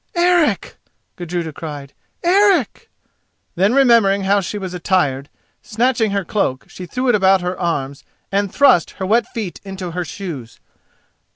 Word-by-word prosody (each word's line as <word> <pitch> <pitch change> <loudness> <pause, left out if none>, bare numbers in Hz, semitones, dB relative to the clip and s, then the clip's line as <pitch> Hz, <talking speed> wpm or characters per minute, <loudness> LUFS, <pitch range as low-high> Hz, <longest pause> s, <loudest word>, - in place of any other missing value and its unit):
"Eric!" 345 -2 +2 0.4
Gudruda 175 -2 -4
cried; 145 -3 -8 0.3
"Eric!" 385 - +2 0.6
Then, 195 +7 +2
remembering 230 -7 +4
how 200 +1 +2
she 200 +3 -5
was 190 -3 -6
attired, 155 -7 0 0.3
snatching 230 0 0
her 200 -2 -2
cloak, 135 -11 -1
she 180 - -10
threw 255 +9 -3
it 245 - +4
about 195 -2 +4
her 180 +1 -3
arms 140 -6 -3 0.3
and 200 -1 0
thrust 275 - +3
her 190 - -3
wet 230 +4 +2
feet 215 -7 -6
into 190 -3 -6
her 180 +2 -3
shoes. 160 - -8
195 Hz, 145 wpm, -18 LUFS, 175-235 Hz, 0.6 s, remembering